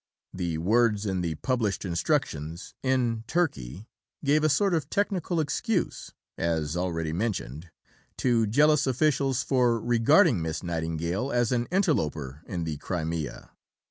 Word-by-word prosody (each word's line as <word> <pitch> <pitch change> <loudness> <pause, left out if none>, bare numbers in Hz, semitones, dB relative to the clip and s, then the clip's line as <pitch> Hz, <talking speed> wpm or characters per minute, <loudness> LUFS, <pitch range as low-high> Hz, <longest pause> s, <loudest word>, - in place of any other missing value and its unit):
The 85 -3 -2
words 105 +4 +2
in 95 -3 -1
the 85 -2 -2
published 110 - -1
instructions 85 -1 -2
"in 125 -4 0
Turkey" 110 - -2 0.4
gave 150 +2 +3
a 155 - +4
sort 195 +5 +2
of 155 -3 -1
technical 185 -4 0
excuse 175 +7 -1 0.3
(as 80 -2 -1
already 85 -3 -2
mentioned) 85 - -3 0.5
to 115 -3 +2
jealous 150 +5 +4
officials 135 -1 +1
for 120 -2 +2
regarding 120 - +4
Miss 80 +1 -3
Nightingale 85 - -2
as 120 -1 +1
an 120 -1 0
interloper 80 - 0
in 85 -2 -3
the 80 -2 -3
Crimea. 80 -3 -4
110 Hz, 130 wpm, -27 LUFS, 85-135 Hz, 0.5 s, a